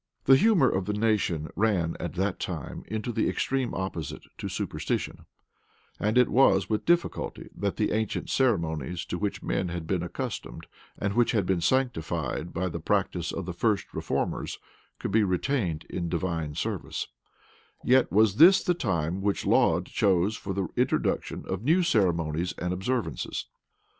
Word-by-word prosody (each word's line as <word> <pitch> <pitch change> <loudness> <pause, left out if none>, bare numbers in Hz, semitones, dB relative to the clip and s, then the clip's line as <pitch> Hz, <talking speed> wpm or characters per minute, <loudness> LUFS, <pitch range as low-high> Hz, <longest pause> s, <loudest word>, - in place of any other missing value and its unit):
The 135 - +8
humor 195 -3 +5
of 95 -5 0
the 105 - -1
nation 105 -8 0
ran 95 -6 +1
at 85 - -4
that 95 +1 -1
time 85 -7 -5
into 110 +2 -3
the 110 -1 +1
extreme 135 -2 -1
opposite 95 -4 -4 0.2
to - - -4
superstition; - - -3 0.7
and 110 +3 +1
it 125 - +6
was 100 -8 +4
with 110 0 -1
difficulty 175 0 0
that 100 -1 -2
the 105 - 0
ancient 110 -1 -1
ceremonies 85 - 0
to 90 - -4
which 100 -1 -2
men 90 - -1
had 85 -1 -4
been 90 +1 0
accustomed, 65 -7 -5 0.3
and 100 -1 -1
which 120 +2 +3
had 105 -5 +2
been 90 -2 +1
sanctified 85 - -1
by 95 +3 -1
the 85 - -4
practice 85 -1 0
of 95 - -4
the 90 - -4
first 105 +3 0
reformers, - - -2 0.4
could - - -4
be 110 +1 +4
retained 90 - -1
in 85 -2 -3
divine 80 -3 -2
service: - - -3 0.8
yet 130 +1 +4
was 105 0 +4
this 180 +6 +8
the 180 - +2
time 95 - -1
which 100 0 0
Laud - - +3
chose 95 +2 +2
for 100 - -5
the 95 -1 -1
introduction - - 0
of 95 0 -3
new 165 +7 +4
ceremonies 85 - +1
and 90 0 -2
observances. 95 - -2
95 Hz, 160 wpm, -27 LUFS, 85-110 Hz, 0.8 s, The